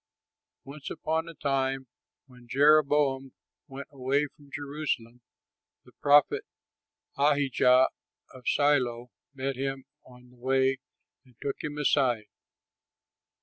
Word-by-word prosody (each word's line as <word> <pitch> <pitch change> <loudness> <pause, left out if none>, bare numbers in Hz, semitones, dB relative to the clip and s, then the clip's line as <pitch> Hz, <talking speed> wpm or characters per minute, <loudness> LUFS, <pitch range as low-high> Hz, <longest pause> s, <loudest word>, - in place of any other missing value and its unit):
Once 140 +1 -9
upon 160 +1 -2
a 165 - -11
time, 135 -2 -1 0.4
when 125 -2 -18
Jeroboam 140 -1 +3 0.3
went 135 +1 -8
away 140 +1 0
from 145 0 -16
Jerusalem, 140 -5 -4 0.6
the - - -18
prophet 145 0 +4 0.8
Ahijah 135 -3 +4 0.4
of 125 -1 -13
Shiloh 125 -5 +1 0.2
met 135 0 -2
him 135 0 -3 0.2
on 125 0 -17
the 125 - -21
way 130 +1 +1 0.4
and 125 -3 -24
took 140 - -4
him 150 -1 -4
aside. 130 -6 +2
135 Hz, 105 wpm, -28 LUFS, 130-145 Hz, 0.8 s, prophet